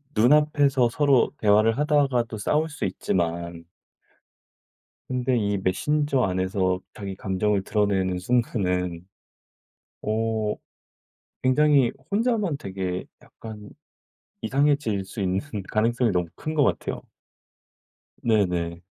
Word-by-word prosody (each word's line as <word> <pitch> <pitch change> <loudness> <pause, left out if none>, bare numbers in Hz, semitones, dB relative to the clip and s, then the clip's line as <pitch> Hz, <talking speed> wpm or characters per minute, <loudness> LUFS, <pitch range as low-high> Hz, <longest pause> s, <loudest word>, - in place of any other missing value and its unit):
눈앞에서 140 +1 +4
서로 140 -1 +3
대화를 110 +2 +4
하다가도 140 -7 +1
싸울 155 +8 +1
수 145 - -4
있지만 85 -2 -2 1.4
근데 125 0 0
이 100 -3 0
메신저 140 +9 0
안에서 95 -1 0
자기 100 -2 -6
감정을 95 +1 0
드러내는 95 -4 0
순간은 90 -5 -1 1.0
어 110 0 -1 0.9
굉장히 135 -1 +4 0.2
혼자만 210 - +1
되게 95 -4 -4 0.2
약간 105 -2 -11 0.7
이상해질 140 -8 +1
수 100 - -7
있는 95 0 0 0.3
가능성이 115 +1 +2
너무 90 -2 0
큰 155 - -5
것 145 - +4
같아요. - - -1 1.2
네네. 90 -6 0
110 Hz, 225 characters per minute, -25 LUFS, 95-135 Hz, 1.4 s, 눈앞에서